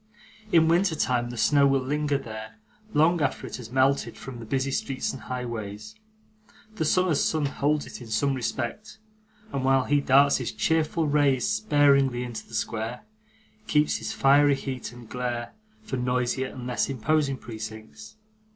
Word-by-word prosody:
In 160 -1 +5
winter 170 +1 +3
time, 125 -4 0
the 120 - -7
snow 140 +5 +4
will 135 0 +3
linger 145 +2 0
there, 110 -3 -8 0.4
long 160 +1 +3
after 140 - -1
it - - -6
has 120 -3 -9
melted 135 +2 +1
from 130 -3 -8
the 115 - -9
busy 135 +2 -1
streets 135 0 -2
and 135 - -8
highways. 110 -4 -6 0.8
The 160 - 0
summer's 180 -1 +2
sun 155 -2 +1
holds 145 +2 0
it - - -10
in 120 - -9
some 110 +6 +1
respect, 130 - -4 0.6
and 135 - -1
while 135 0 +3
he 145 +1 +2
darts 140 +1 +5
his 125 -4 -3
cheerful 160 +7 +1
rays 145 -3 +2
sparingly 145 - +3
into 115 -3 -7
the 110 - -9
square, 115 +2 -3 0.7
keeps 150 -6 +2
his 110 0 -5
fiery 140 +1 +4
heat 130 -3 -5
and 120 -1 -12
glare 120 0 -4 0.3
for 135 -11 -4
noisier 125 +1 0
and 125 -2 -8
less 125 +2 -1
imposing 135 +2 0
precincts. 110 - -9
130 Hz, 160 wpm, -26 LUFS, 120-145 Hz, 0.8 s, In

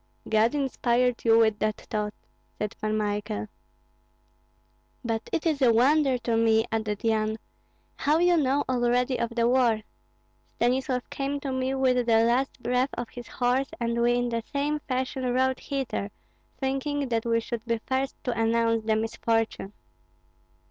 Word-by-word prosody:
'" - - -14
"God 225 +6 +3
inspired 250 -3 +1
you 225 -1 +5
with 220 -2 +3
that 215 0 0
thought," 210 -1 -3 0.4
said 210 +1 -3
Pan 215 0 0
Michael. 210 0 -2 1.6
"But 225 -1 -2
it 325 - -1
is 305 -4 +1
a 250 -3 +6
wonder 270 +3 +3
to 235 -1 -1
me," 225 0 +3
added 215 -2 -2
Yan, 220 -1 +1 0.6
"how 300 +2 +2
you 350 +1 +4
know 285 -2 +2
already 250 0 +1
of 235 - 0
the 235 -1 +2
war. 240 -4 +3 0.7
Stanislav 250 +1 0
came 280 +1 -2
to 275 - -3
me 260 +1 -1
with 255 -2 +2
the 225 -1 +5
last 245 +2 0
breath 250 +2 +1
of 240 -1 -5
his 245 -1 -9
horse, 250 +2 0
and 235 0 -1
we 240 0 +3
in 245 0 0
that 230 -1 -3
same 290 +2 -1
fashion 260 0 -1
rode 260 0 +1
hither, 270 -7 -3 0.5
thinking 275 +1 -2
that 230 -2 0
we 230 0 +2
should 230 0 -5
be 230 0 0
first 265 +1 -1
to 250 - -1
announce 230 0 +1
the 220 -1 +2
misfortune." 225 -2 -1
240 Hz, 160 wpm, -26 LUFS, 225-265 Hz, 1.6 s, a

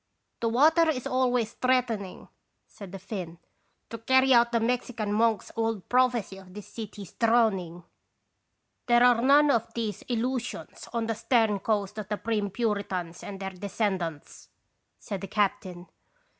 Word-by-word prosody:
"The 230 - 0
water 315 +7 +4
is 255 -6 -2
always 250 -3 +1
threatening," 240 -7 -1 0.4
said 200 -3 -12
the 195 - -6
Finn, 185 -4 -7 0.5
"to 230 - -6
carry 260 +3 +4
out 235 0 +5
the 235 - +2
Mexican 230 -2 -1
monk's 225 0 +1
old 225 -3 -2
prophecy 245 -6 +1
of 185 -1 -14
this 210 - -8
city's 210 -4 -9
drowning." 210 -7 +1 0.5
" - - -51
There 240 0 +5
are 245 -2 +5
none 285 +3 +5
of 230 -5 0
these 220 -4 -3
illusions 245 +1 -3
on 235 -2 -1
the 225 - -1
stern 225 -2 +1
coast 210 0 -1
of 210 -1 -7
the 210 - -1
prim 215 -3 -1
Puritans 195 -6 -3
and 195 -1 -8
their 195 0 -4
descendants," 185 -5 -4 0.5
said 190 - -6
the 195 - -5
captain. 185 -3 -1
225 Hz, 150 wpm, -27 LUFS, 195-240 Hz, 0.5 s, out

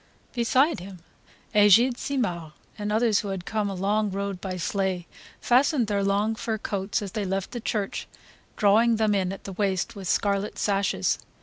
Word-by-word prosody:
Beside 255 - +2
him 185 +1 -9 0.6
Egide 210 +4 +6
Simard, 180 - -3 0.2
and 210 -1 -4
others 220 -1 +3
who 205 - -4
had 190 -2 -4
come 215 -2 -1
a 195 - -4
long 205 +3 0
road 200 -1 -4
by 185 -2 -4
sleigh, 185 +2 -1 0.3
fastened 255 +1 +3
their 200 -1 0
long 200 +3 +1
fur 220 0 -3
coats 200 0 -2
as 195 - -6
they 210 0 -2
left 195 0 -2
the 240 - -4
church, 210 -3 -3 0.5
drawing 220 +3 +4
them 215 -1 +2
in 190 -2 0
at 195 - -8
the 195 - -7
waist 190 +1 -1
with 195 -2 -7
scarlet 200 +2 0
sashes. 195 - 0
200 Hz, 175 wpm, -26 LUFS, 195-220 Hz, 0.6 s, Egide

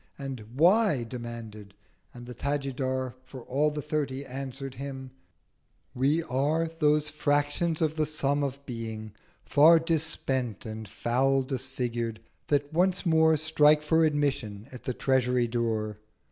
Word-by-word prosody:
And 135 -3 -5 0.2
'Why?' 175 - +4
demanded. 115 -4 -8 0.4
And 120 0 -11
the 125 - -8
Tajidar 130 -1 -2
For 130 0 -10
all 145 +5 +1
the 150 -1 -5
Thirty 140 -3 -2
answer'd 135 0 -6
him—'We 135 +2 -5
are 155 +4 0
Those 150 -2 +1
Fractions 145 +3 0
of 155 0 0
the 155 -1 +1
Sum 145 -2 0
of 140 0 -4
Being, 110 -3 -6 0.3
far 160 +3 +7
Dis 165 -1 +1
spent 130 - -2
and 110 -1 -7
foul 135 +5 +1
disfigured, 125 -4 -3 0.3
that 145 +1 0
once 180 +3 +2
more 160 -1 +4
Strike 150 -1 +4
for 160 +2 +3
Admission 140 -9 -1
at 125 - -11
the 130 - -1
Treasury 125 -2 +2
Door.' 110 -3 -2
135 Hz, 130 wpm, -28 LUFS, 125-150 Hz, 0.4 s, far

